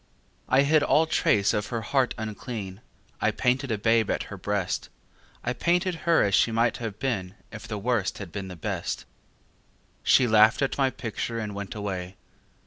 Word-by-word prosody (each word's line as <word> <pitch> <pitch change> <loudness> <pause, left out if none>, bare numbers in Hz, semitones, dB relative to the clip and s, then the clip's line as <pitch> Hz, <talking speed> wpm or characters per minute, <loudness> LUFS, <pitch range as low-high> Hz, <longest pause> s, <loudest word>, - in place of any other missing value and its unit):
I 135 +1 +5
hid 150 +2 +4
all 155 +2 +4
trace 105 -10 +2
of 105 0 -1
her 115 -1 -3
heart 130 +2 +1
unclean; 110 -2 -6 0.4
I - - +3
painted 130 +2 0
a 110 - 0
babe 115 +1 +2
at - - 0
her - - -4
breast; 95 0 -2 0.5
I 120 - -1
painted 180 +5 +1 0.2
her 165 - +5
as 100 - 0
she 95 +5 +4
might 115 +2 +1
have 110 -4 -5
been 105 -7 -2 0.2
If 110 +1 -9
the 105 -1 -4
Worst 110 -2 0
had 100 -5 -8
been 100 +1 -5
the 90 - -8
Best. 85 - -4 1.0
She 130 - +5
laughed 110 +2 +5
at 135 - 0
my 135 -1 +4
picture 115 -1 -4
and 105 -2 -4
went 100 0 -6
away. 95 -3 -4
110 Hz, 180 wpm, -26 LUFS, 100-125 Hz, 1.0 s, I